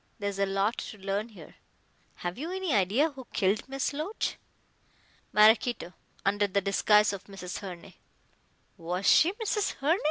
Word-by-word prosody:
There's 200 -2 -3
a 200 - +2
lot 195 +4 0
to 215 - -7
learn 200 +3 -3
here." 180 -8 -14 0.6
"Have 175 0 -4
you 325 +5 -4
any 375 -5 -1
idea 215 - +2
who 265 -3 -11
killed 200 +6 0
Miss 270 +1 -2
Loach?" 315 +9 -3 0.9
"Maraquito, 215 -2 +4 0.3
under 205 +1 +2
the 200 +1 +1
disguise 205 +2 +3
of 200 - -7
Mrs. 190 -3 -7
Herne." 185 -1 -9 0.8
"Was 180 +2 -3
she 335 - +6
Mrs. 420 -1 -1
Herne?" 315 +7 +1
205 Hz, 150 wpm, -29 LUFS, 195-270 Hz, 0.9 s, she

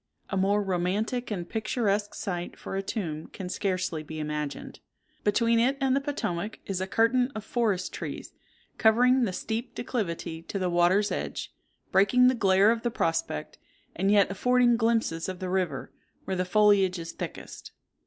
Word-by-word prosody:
A - - 0
more 200 +2 +2
romantic 200 +7 -1
and 180 -5 -4
picturesque 210 -2 -1
site 175 -2 -4
for - - -6
a 195 - 0
tomb 165 -6 -4
can 185 -2 -7
scarcely 185 -5 -1
be 155 +1 -8
imagined. 150 -1 -4 0.4
Between 230 +2 +3
it 260 +4 +2
and 270 -1 +2
the 275 - +1
Potomac 215 -8 -3
is 190 -2 -3
a 190 - -2
curtain 245 +5 +2
of 215 - -5
forest 215 -7 0
trees, - - -6 0.5
covering 245 +3 +5
the 195 - -2
steep 225 +6 -4
declivity 170 -9 -3
to 170 - -5
the 185 -2 -1
water's 180 +4 +3
edge, - - -4 0.4
breaking 225 +7 +5
the - - +2
glare 200 -2 +4
of 230 -1 -1
the 240 - 0
prospect, 165 - -2 0.4
and 195 +3 +1
yet 200 -2 +4
affording 245 +4 +3
glimpses 225 -8 0
of 185 - -5
the 185 0 -4
river, 185 -2 -1 0.3
where 190 - -2
the 185 0 0
foliage 195 -1 +4
is 165 -1 -6
thickest. - - -8
200 Hz, 165 wpm, -27 LUFS, 180-230 Hz, 0.5 s, covering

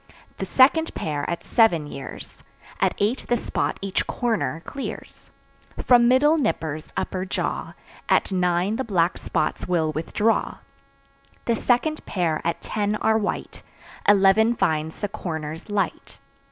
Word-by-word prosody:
The - - -3
second 305 +5 +4
pair 145 -2 -3
at 170 - -3
seven 200 -10 +3
years; 140 -2 -9 0.4
At - - +2
eight 215 +6 -1
the 240 - +3
spot - - -2
each 195 -1 -1
"corner" 225 -9 -1
clears. 275 - -7 0.5
From 240 -1 +5
middle 295 +6 +4
"nippers" 160 - -2
upper 185 -1 -2
jaw, 190 - -3 0.3
At - - +3
nine 180 +3 +1
the 265 - -1
black 180 -6 +1
spots - - -2
will 165 -3 +1
withdraw. 205 +8 0 0.9
The 235 - +2
second 260 +7 +1
pair 170 -5 0
at 170 0 -2
ten 210 0 -1
are 220 +1 +2
white; 210 - -4 0.5
Eleven 205 +3 +5
finds 160 -4 -1
the 205 - 0
"corners" 165 -4 -6
light. 200 -4 -2
195 Hz, 135 wpm, -24 LUFS, 165-230 Hz, 0.9 s, From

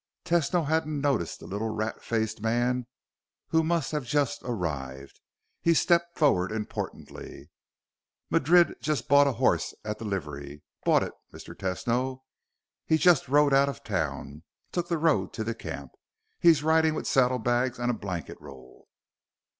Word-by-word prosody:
Tesno 170 0 +1
hadn't 155 -1 0
noticed 135 - -1
the - - -11
little 105 +3 -3
rat 110 0 -3
faced 110 -1 -2
man, 120 +2 0 0.6
who 160 - +3
must 165 +1 0
have 150 -2 -2
just 140 +1 0
arrived. 70 - -5 0.4
He 170 0 +3
stepped 170 +1 +2
forward 100 - +3
importantly. 110 -1 -6 0.8
"Madrid 175 +4 +4
just 155 -1 -1
bought 140 +1 +6
a 140 - +1
horse 125 +2 +1
at 105 0 -4
the 115 - -6
livery. 75 -7 -5 0.2
Bought - - +4
it, - - -6 0.2
Mr. - - -10
Tesno. 125 +7 -2 0.6
He 160 - +4
just 165 -1 +4
rode 145 +1 +4
out 140 +1 +4
of 140 - -8
town. 70 +3 -3 0.3
Took 175 -1 -2
the 170 - 0
road 150 - +1
to 110 - -3
the 115 +1 -2
camp. 80 - -7 0.5
He's 165 -4 +5
riding 160 0 +3
with - - -4
saddlebags 125 -1 +1
and 120 0 0
a - - -2
blanket 95 -7 -6
roll." 65 0 -14
125 Hz, 150 wpm, -27 LUFS, 105-155 Hz, 0.8 s, bought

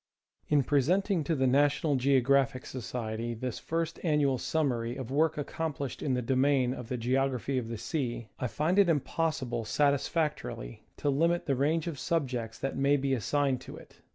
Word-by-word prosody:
In 145 -2 +3
presenting 170 - +2
to 165 - +1
the 135 -2 +1
National 145 +3 +3
Geographic 135 0 +2
Society 115 -2 -4
this 125 +1 -4
first 165 0 -2
an 155 -4 +2
nual 135 -3 +2
summary 125 -7 -1
of 130 -2 -6
work 155 +2 +2
accomplished 145 -2 -4
in 135 -3 0
the 125 - -1
domain 130 0 +2
of 125 -3 -8
the 125 - -2
Geog 130 +3 +1
raphy 130 +1 -2
of 115 - -5
the 115 0 -4
Sea, 120 0 -3
I 125 - -1
find 160 - +1
it 195 -3 +5
impossible 140 -6 -1
satisfactorily 145 - -1
to 145 - 0
limit 170 +5 +1
the 140 - +1
range 150 +5 +1
of 165 -6 -4
subjects 125 -9 -2
that 135 - -3
may 140 +2 +3
be 135 0 0
assigned 135 +1 0
to - - -9
it. - - -16
135 Hz, 180 wpm, -30 LUFS, 125-150 Hz, -, it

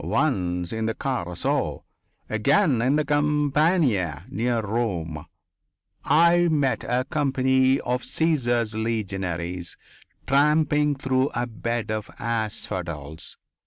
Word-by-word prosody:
Once 90 - 0
in 110 0 -1
the 115 - -2
Carso. 90 -11 -2 0.4
Again 125 - +2
on 130 +4 +2
the 150 0 +1
campagna 145 - +1
near 120 +3 0
Rome. 95 -8 -3 0.8
I 170 +2 +4
met 145 -5 +1
a 125 +1 0
company 130 -2 +2
of 125 +1 -2
Caesar's 120 -9 0
legionaries 95 -6 -3 0.5
tramping 150 +1 +3
through 130 0 +1
a 120 - 0
bed 115 -1 -3
of 110 -1 -3
asphodels. 90 -9 -4
120 Hz, 100 wpm, -24 LUFS, 100-145 Hz, 0.8 s, I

